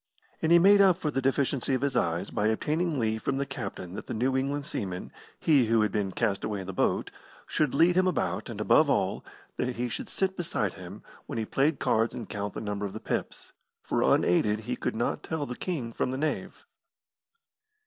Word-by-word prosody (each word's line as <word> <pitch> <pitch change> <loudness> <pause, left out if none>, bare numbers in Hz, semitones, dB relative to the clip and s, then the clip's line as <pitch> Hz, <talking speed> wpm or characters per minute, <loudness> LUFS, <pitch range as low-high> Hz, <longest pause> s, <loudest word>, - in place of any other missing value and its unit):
And 160 - +1
he 170 - +9
made 200 +3 +7
up 190 -3 +5
for 155 -5 -2
the 135 - -1
deficiency 135 0 +1
of 130 - -2
his 140 -2 0
eyes 85 -4 0
by 105 - 0
obtaining 155 +8 0
leave 110 -2 0
from 135 - -1
the 140 - 0
captain 125 -9 -6
that - - -7
the - - -4
New 130 +4 +1
England 140 +2 -1
seaman 90 -7 -4 0.3
he 140 -7 +4
who 115 0 +3
had 105 -2 +1
been 100 -2 -1
cast 100 -1 -1
away 105 -2 -2
in - - -7
the 95 - -6
boat - - 0 0.3
should 150 -4 0
lead 170 +4 +5
him 185 0 +4
about, 185 - -1
and, - - -6
above - - +4
all, - - 0 0.3
that 125 0 -1
he 120 +1 -2
should - - -4
sit 190 0 0
beside 140 - -1
him 95 +2 -10 0.2
when - - -5
he 110 - -1
played 140 +6 +1
cards 115 -1 +1
and 115 - -6
count 100 -2 -4
the - - -4
number 105 -1 -3
of 95 - -10
the 110 - -5
pips, - - -4 0.3
for - - 0
unaided 105 +5 +3
he 110 - -3
could - - -3
not - - -1
tell 160 -2 -3
the 125 - -5
king 130 -11 -4
from - - -1
the 130 - -2
knave. 155 +2 -3
125 Hz, 220 wpm, -28 LUFS, 105-150 Hz, 0.3 s, he